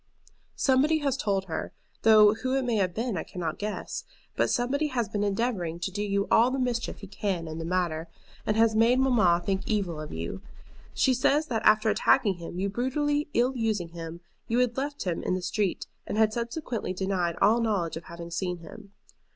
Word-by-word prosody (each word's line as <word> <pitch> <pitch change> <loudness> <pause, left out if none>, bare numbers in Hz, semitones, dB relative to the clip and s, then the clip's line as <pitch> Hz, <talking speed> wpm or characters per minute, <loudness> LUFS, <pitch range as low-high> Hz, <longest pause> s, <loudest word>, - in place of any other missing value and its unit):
Somebody 280 +4 +3
has 275 -2 +2
told 200 -8 -1
her, 165 - -4 0.3
though 215 -1 +7
who 255 +4 -2
it 270 -1 0
may 235 -3 +1
have 185 -3 0
been 230 -1 -1
I - - -2
cannot 170 -3 -5
guess, 210 0 -4 0.3
but - - +2
somebody 275 +5 +1
has 245 -6 -1
been 205 +1 -2
endeavoring 195 -5 -1
to 190 - -3
do 205 +2 -3
you 200 -1 0
all 235 +2 +6
the 265 - -2
mischief 245 -4 -2
he 200 - -8
can 190 -4 -3
in 160 +1 -6
the 165 - -4
matter, 170 -2 -1 0.4
and 215 - 0
has 225 -1 +4
made 230 +3 +4
mamma 220 -10 +3
think 195 -1 0
evil 190 -8 -1
of 155 - -7
you. 85 - -5 0.5
She 260 - +3
says 285 +5 +2
that 225 -3 0
after 215 +1 +5
attacking 200 -3 +3
him, 170 0 -7
and 195 +1 -1
brutally 290 +5 0
ill 250 +3 +2
using 215 -7 -1
him, 165 0 -8 0.3
you 230 - 0
had 250 -1 +2
left 285 +2 -3
him 180 -4 -2
in 185 - 0
the 185 - -3
street, 195 0 -1 0.2
and - - -3
had 220 -1 +3
subsequently 235 - -3
denied 185 -2 -1
all 220 +4 +4
knowledge 200 -7 0
of 165 - -7
having 170 0 -9
seen 180 +1 -2
him. 200 +5 -13
210 Hz, 200 wpm, -27 LUFS, 180-245 Hz, 0.5 s, though